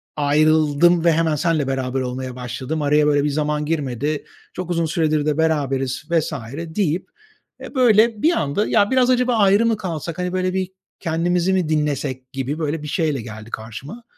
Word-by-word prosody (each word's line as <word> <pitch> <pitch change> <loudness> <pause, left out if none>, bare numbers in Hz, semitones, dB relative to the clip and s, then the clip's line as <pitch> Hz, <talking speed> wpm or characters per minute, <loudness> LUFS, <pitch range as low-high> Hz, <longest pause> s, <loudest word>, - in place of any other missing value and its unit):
ayrıldım 155 +3 +3
ve 170 - +6
hemen 160 -1 +1
seninle 155 -3 0
beraber 130 -1 -1
olmaya 130 0 -4
başladım, 130 +5 -4
araya, 150 +1 +3
böyle, 145 -1 +3
bir 150 - +1
zaman 150 +1 -1
girmedi, 145 -1 -2 0.3
çok 180 -1 -5
uzun 170 -1 +1
süredir 155 -2 0
de 150 -1 0
beraberiz..." 135 -5 0
vs. 165 -1 +1 0.4
deyip, 180 -4 0 0.5
eee, - - -9
böyle, 225 -3 +4
bir 330 - +4
anda: 160 - 0
"Ya, 205 - +3
biraz 255 -1 +3
acaba 250 -1 +2
ayrı 205 +2 +4
mı 225 -2 +2
kalsak? 170 -4 -5
Hani, 180 0 -2
böyle, 185 0 0
bir 190 0 -2 0.3
kendimizi 175 +2 0
mi 180 -4 0
dinlesek?" 140 -4 -2
gibi, 135 +3 -3
böyle, 155 0 -2
bir - - -5
şeyle 150 -4 -1
geldi 110 -1 -9
karşıma. 130 - -8
155 Hz, 175 wpm, -21 LUFS, 140-180 Hz, 0.5 s, ve